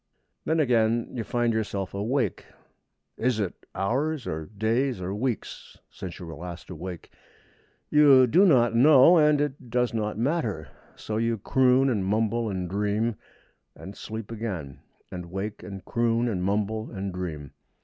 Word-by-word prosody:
Then 160 +1 +1
again 115 -4 +2
you 120 - -3
find 120 +1 0
yourself 100 -3 -3
awake. 115 +7 -1 0.7
Is 120 -1 0
it 100 -5 -4
hours 135 +7 -1
or 80 0 -4
days 115 +4 0
or 90 +1 -4
weeks 115 +2 -4
since 90 -2 -8
you 90 - -8
were 80 - -8
last 85 +2 -8
awake? 90 0 -8 0.8
You 140 -3 +7
do 165 - +4
not 120 - +4
know, 145 +6 +7
and 150 -2 +4
it 140 -4 -3
does 125 0 0
not 105 -2 -2
matter. 115 - -1 0.3
So 110 - -4
you 115 0 0
croon, 130 +4 +3
and 110 -7 0
mumble, 110 +3 0
and 95 -2 -3
dream, 105 +4 -1 0.6
and 95 +1 -10
sleep 110 0 -7
again; 95 - -5 0.3
and 90 -1 -6
wake, 100 +4 -5
and 95 0 -9
croon, 115 0 +1
and 95 -6 -2
mumble, 105 +3 -1
and 95 -2 -5
dream. 80 -6 -5
110 Hz, 150 wpm, -26 LUFS, 95-125 Hz, 0.8 s, You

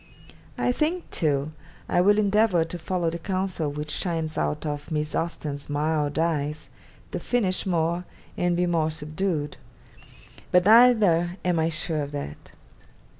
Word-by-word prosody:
I 245 - +1
think, 320 +7 -1
too, 145 -2 0 0.4
I 175 - +2
will 205 +3 +4
endeavour 205 -4 +3
to 175 +2 -5
follow 170 0 -1
the 170 - -5
counsel 185 -4 -2
which 150 +1 -5
shines 165 -4 -1
out 150 +1 -1
of 145 -1 -4
Miss 150 -1 -2
Austen's 150 -4 -3
"mild 150 0 0
eyes," 155 -2 -1 0.4
to - - -3
finish 200 -7 0
more, 170 0 0 0.3
and 175 -1 0
be 180 - +2
more 165 -3 +1
subdued; 155 0 -3 0.9
but 180 0 +4
neither 205 -7 +5
am 175 -2 +2
I 160 +1 +2
sure 155 -1 -1
of 145 0 -5
that. 75 - -7
165 Hz, 145 wpm, -25 LUFS, 150-185 Hz, 0.9 s, neither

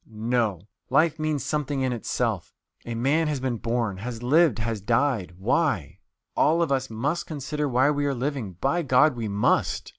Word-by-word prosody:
No; 110 -4 -1 0.2
life 160 0 +3
means 155 -2 -1
something 145 -2 -1
in 130 -1 0
itself.... 120 - -2 0.3
A 120 - -3
man 145 +7 +1
has 150 -3 -1
been 130 -2 -2
born, 115 -4 -1
has 115 +3 -6
lived, 150 0 +4
has 110 -2 -3
died 115 -4 0
why? 105 - 0 0.4
All 165 +3 +3
of 160 - -2
us 135 -1 0
must 135 +10 -2
consider 150 0 -3
why 130 +3 +3
we 145 -1 0
are 140 - 0
living, 125 -6 -3
by 140 - 0
God, 135 0 +4
we 115 -2 -3
must! 100 0 +1
130 Hz, 175 wpm, -25 LUFS, 115-150 Hz, 0.4 s, lived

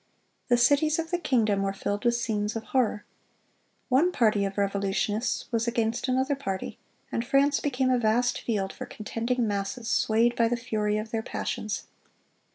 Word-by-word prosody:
The 245 - +4
cities 290 +6 +3
of 330 0 -3
the 350 - +1
kingdom 220 - +2
were 195 0 -1
filled 205 +2 -3
with 240 0 +4
scenes 215 -2 -1
of 225 - -3
horror. 230 -5 0 0.8
One 290 +7 +3
party 215 - +2
of 195 +1 -4
revolutionists 200 +3 0
was 230 0 0
against 235 +1 0
another 260 +2 +1
party, 195 -9 -5 0.3
and 230 - -1
France 275 +3 +3
became 260 -2 0
a 250 - +3
vast 240 +2 +1
field 200 -4 -2
for - - -7
contending 230 +2 -2
masses, 205 +4 -3
swayed 230 +2 +2
by 230 -1 +3
the 240 +1 0
fury 215 -3 -1
of 215 +1 -5
their 225 - -1
passions. 215 -1 -3
230 Hz, 165 wpm, -27 LUFS, 210-255 Hz, 0.8 s, The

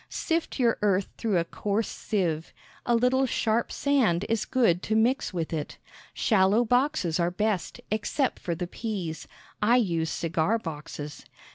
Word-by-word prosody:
Sift 330 -1 -2
your 235 -3 +2
earth 195 -2 +2
through 215 -5 +1
a 170 - +2
coarse 205 +5 -1
sieve. 170 -6 -2 0.3
A 240 - +4
little 255 +3 +3
sharp 230 -1 0
sand 235 -11 +2
is 220 -1 0
good 185 -9 +2
to 220 - -1
mix 235 +5 +2
with 170 -3 -3
it. 150 -2 -4 0.3
Shallow 210 +2 +3
boxes 245 - +1
are 170 0 +2
best, 205 0 -1
except 245 +5 0
for 170 - -3
the 180 +2 -3
peas. 180 -5 -5 0.3
I 225 +3 +4
use 170 -9 +1
cigar 165 +7 0
boxes. 150 -5 -7
210 Hz, 150 wpm, -27 LUFS, 170-235 Hz, 0.3 s, A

